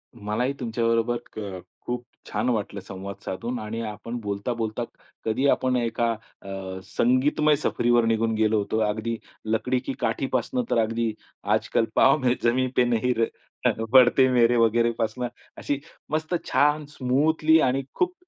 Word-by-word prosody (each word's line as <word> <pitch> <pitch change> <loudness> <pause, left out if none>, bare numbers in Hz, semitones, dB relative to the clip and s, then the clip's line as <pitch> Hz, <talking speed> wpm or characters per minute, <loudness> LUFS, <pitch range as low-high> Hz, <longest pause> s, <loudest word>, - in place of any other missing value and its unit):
मलाही 115 +4 -1
तुमच्याबरोबर 115 0 +1 0.2
क 100 -4 -5 0.3
खूप 120 0 -3 0.3
छान 125 - 0
वाटलं 105 -3 -1
संवाद 95 +1 -7
साधून 120 +6 -3
आणि 110 +2 -4
आपण 110 +3 -6
बोलता-बोलता 110 +3 -2 0.4
कधी 125 +6 +1
आपण 130 -1 +2
एका 115 -1 +1 0.3
अ, 100 - -10 0.4
संगीतमय 145 +5 +2
सफरीवर 120 -4 +2
निघून 115 0 +1
गेलो 110 0 +2
होतो. 105 +1 -1
अगदी 110 +2 -1 0.3
लकडी 115 +4 0
की - - -2
काठी - - 0
पासनं 250 - 0
तर - - +2
अगदी 115 0 -1 0.4
आजकाल 115 - +1
पाव 135 +2 +6
में 125 -3 +2
जमी 125 +2 +2
पे 125 - +5
नही 120 +1 +1
र 115 - +3 0.7
बढते 130 0 +7
मेरे 120 -1 +4
वगैरे 115 +1 +3
पासनं, 115 +3 -1 0.3
अशी 145 -1 -2 0.3
मस्त 160 +3 -1
छान 150 +1 +2
स्मूथली 155 +4 +3
आणि 135 +2 0
खूप 365 0 +1
120 Hz, 145 wpm, -25 LUFS, 110-130 Hz, 0.7 s, बढते